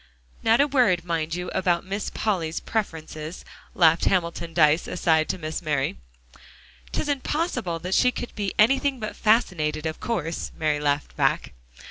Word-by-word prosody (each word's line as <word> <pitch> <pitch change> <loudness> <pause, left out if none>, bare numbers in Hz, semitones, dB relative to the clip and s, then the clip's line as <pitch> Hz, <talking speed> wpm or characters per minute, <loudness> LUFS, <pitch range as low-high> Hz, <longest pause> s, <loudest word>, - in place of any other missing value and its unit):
"Not 225 +1 +4
a 285 - +6
word, 235 - +2
mind 165 -1 -1
you, 180 0 -4
about 175 -1 +1
Miss 200 +2 -3
Polly's 170 -7 -1
preferences," 160 -6 -4 0.3
laughed 165 -2 +4
Hamilton 170 -2 0
Dyce 155 -1 +3
aside 160 -3 +1
to - - -1
Miss 155 -1 -4
Mary. 150 -4 -1 1.0
"'Tisn't 285 -3 -1
possible 250 - -1
that 180 +3 -4
she 250 - +5
could 245 - -6
be 200 -3 -2
anything 270 +4 +3
but 215 - -5
fascinated, 160 -9 +1
of 160 0 -3
course," 170 -8 -3
Mary 155 -2 +1
laughed 145 0 -1
back. - - +1
175 Hz, 150 wpm, -25 LUFS, 160-215 Hz, 1.0 s, a